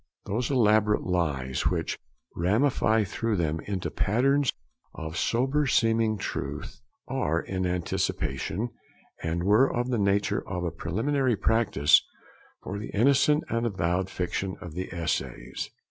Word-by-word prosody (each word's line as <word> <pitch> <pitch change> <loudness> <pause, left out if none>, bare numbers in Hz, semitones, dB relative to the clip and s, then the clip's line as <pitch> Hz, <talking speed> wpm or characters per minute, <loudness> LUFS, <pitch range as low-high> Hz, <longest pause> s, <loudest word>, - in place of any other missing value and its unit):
Those 110 +4 -1
elaborate 105 -5 +3
lies, 70 -8 -1
which - - -1 0.4
ramify 110 +3 +2
through 110 +3 -1
them 80 -3 0
into 95 -3 -2
patterns 135 +6 +2 0.4
of 80 0 -6
sober 135 +9 +1
seeming 115 -2 +2
truth, 100 - -5 0.3
are 120 - 0
in 95 +1 -2
anticipation, 90 - -2 0.5
and 85 +1 -1
were 105 +8 +4
of 120 +1 -1
the 120 - +1
nature 100 0 +1
of 90 -2 -3
a 85 - -1
preliminary 125 - 0
practice 110 -10 +4 0.6
for 100 +2 -4
the 105 - -6
innocent 140 +6 +4
and 115 0 0
avowed 95 -2 -1
fiction 95 +1 -3
of 85 -3 -8
the 90 +3 -5
essays. 70 -7 -3
100 Hz, 130 wpm, -27 LUFS, 90-120 Hz, 0.6 s, were